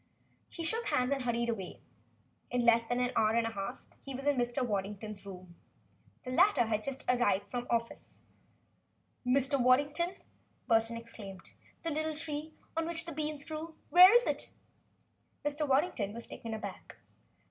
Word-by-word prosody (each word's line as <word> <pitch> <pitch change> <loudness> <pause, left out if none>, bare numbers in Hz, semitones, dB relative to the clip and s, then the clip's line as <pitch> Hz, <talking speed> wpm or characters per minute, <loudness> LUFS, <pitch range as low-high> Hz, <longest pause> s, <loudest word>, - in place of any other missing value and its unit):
He 335 - -6
shook 450 +9 0
hands 250 +1 +1
and 275 -1 +1
hurried 235 0 0
away. 195 -6 -4 0.7
In 245 -1 0
less 235 0 +6
than 245 +2 -1
an 250 0 +1
hour 215 0 +3
and 235 -1 +2
a 225 - -2
half 195 -2 -5 0.2
he 275 -1 -6
was 275 +2 -6
in 290 -1 +3
Mr. 245 +1 0
Waddington's 205 -1 -4
rooms. 185 -2 -10 0.7
The 255 - -4
latter 360 -1 +5
had 215 -2 -1
just 275 +2 -3
arrived 205 -5 +2
from 245 0 -3
the - - -19
office. 230 0 -3 1.0
"Mr. 270 +2 +2
Waddington," 290 +8 +3 0.5
Burton 225 -1 +2
exclaimed, 210 -4 -10 0.3
"the 330 - -1
little 310 +1 -1
tree 305 0 -4 0.2
on 330 0 0
which 335 0 0
the 335 - -5
beans 300 -1 -3
grew 315 +1 -6 0.2
where 365 +2 +10
is 480 +1 +6
it?" - - -2 0.9
Mr. 295 +1 -1
Waddington 265 - +1
was 235 - -6
taken 225 -1 -6
aback. 215 - -8
250 Hz, 165 wpm, -32 LUFS, 225-305 Hz, 1.0 s, where